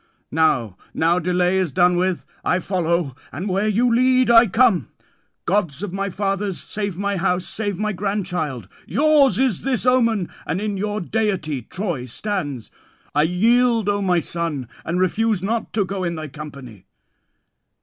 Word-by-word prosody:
"Now, 130 - +1 0.2
now 170 +2 +2
delay 180 +2 +1
is 180 -5 0
done 175 +6 +3
with: 180 0 0 0.2
I 180 - +2
follow, 170 -6 -1 0.2
and 175 +7 -5
where 195 +2 0
you 230 +3 +2
lead, 255 0 +4
I 230 0 +7
come. 215 - +3 0.6
Gods 175 -4 0
of 195 -3 -4
my 195 +1 -2
fathers, 195 0 -2
save 200 -4 -4
my 200 0 -1
house, 180 0 0
save 205 -4 -3
my 215 +1 -1
grandchild. 180 - -3 0.2
Yours 290 -7 +4
is 255 -7 +1
this 255 -3 -1
omen, 230 -7 +2 0.2
and 180 - -1
in 210 -1 -2
your 210 +2 -2
deity 185 - -1
Troy 170 - -4
stands. 145 - -4 0.4
I 150 - +3
yield, 225 +6 +3
O 205 0 0
my 180 -2 +2
son, 165 -6 -3 0.2
and 170 +2 -2
refuse 205 +1 +1
not 225 +3 -2
to 205 -3 +1
go 190 0 -4
in 170 -1 -2
thy 155 -1 -6
company." 130 -8 -10
190 Hz, 160 wpm, -21 LUFS, 170-215 Hz, 0.6 s, I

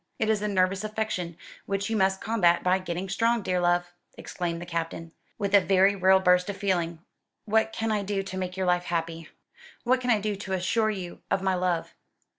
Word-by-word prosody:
It 220 0 +1
is 210 -2 0
a 210 - -1
nervous 190 0 +1
affection, 215 -6 -3 0.3
which 200 0 -1
you - - +1
must 190 -2 +1
combat 190 -6 +2
by 185 +1 +3
getting 185 0 -4
strong. 230 +3 +1
Dear 180 -1 0
love!" 175 0 +1 0.2
exclaimed 170 -2 -4
the 175 - -7
Captain, 165 -1 -4 0.3
with 200 -2 -2
a 200 - +7
very 195 +1 +4
real 190 0 +5
burst 180 0 +3
of 200 - -4
feeling, 175 -4 -1 0.4
"what 220 +1 +2
can 225 0 -2
I 210 -1 +1
do 200 0 -2
to 190 -1 -7
make 185 0 -4
your 190 - 0
life 180 0 +1
happy? 165 -1 -3 0.5
what 255 +1 +2
can 250 - -2
I 225 -3 +4
do 210 0 -2
to 190 -1 -5
assure 215 +4 +1
you 185 -5 -6
of 190 - 0
my 190 -1 +2
love?" 180 -2 -1
190 Hz, 210 wpm, -27 LUFS, 175-205 Hz, 0.5 s, a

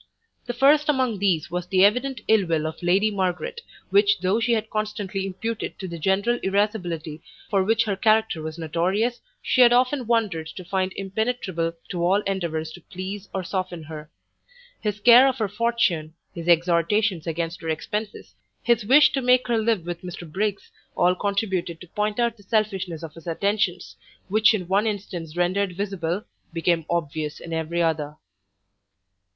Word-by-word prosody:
The 245 - -3
first 290 +4 +4
among 255 -7 +1
these 170 -5 +1
was 180 0 -3
the 190 +1 +5
evident 250 +3 +1
ill 215 -4 +4
will 160 -2 0
of 160 0 -5
Lady 190 +5 +3
Margaret, 200 - -2 0.3
which 200 0 +4
though 190 +4 +2
she 235 +1 +1
had 220 -1 -1
constantly 205 -2 -3
imputed 225 +4 -4
to 190 - -6
the 170 -1 -7
general 200 +8 +1
irascibility 180 -6 -1 0.3
for 195 -2 +3
which 225 +4 +2
her 205 -3 -1
character 215 -4 +2
was 155 +1 -6
notorious, 185 +9 -1 0.2
she 255 - +3
had 240 -1 +8
often 250 +1 +2
wondered 210 -9 0
to 180 +3 -9
find 185 +1 -1
impenetrable 195 -4 -2 0.2
to 175 -1 -2
all 190 +4 +3
endeavours 170 -6 -3
to 175 - -12
please 190 +4 -7
or 190 - -3
soften 180 -2 -4
her. 155 0 -9 0.7
His 210 -1 -2
care 245 +4 +8
of 265 -1 0
her 220 -4 0
fortune, 205 -7 0 0.2
his 170 0 -7
exhortations 175 +2 +2
against 165 +1 -3
her 165 - -4
expences, 205 - -4 0.3
his 235 -2 +2
wish 270 +8 +6
to 270 - -1
make 250 0 +3
her 235 -2 +2
live 220 -6 0
with 175 -1 -5
Mr 180 -1 -8
Briggs, 200 +5 -3 0.3
all 180 +1 +4
contributed 190 -3 -2
to 180 - -12
point 210 +3 -2
out 235 -1 +1
the - - -17
selfishness 195 -5 -1
of 160 -2 -7
his 165 +1 -13
attentions, 190 +1 -1 0.3
which 215 +2 +5
in 185 -5 -4
one 200 +4 +2
instance 180 -6 -5
rendered 185 +2 +1
visible, 195 -2 -2 0.3
became 165 -1 0
obvious 155 -2 -2
in 165 - -7
every 165 +1 -1
other. 150 -2 -1
195 Hz, 170 wpm, -24 LUFS, 170-220 Hz, 0.7 s, had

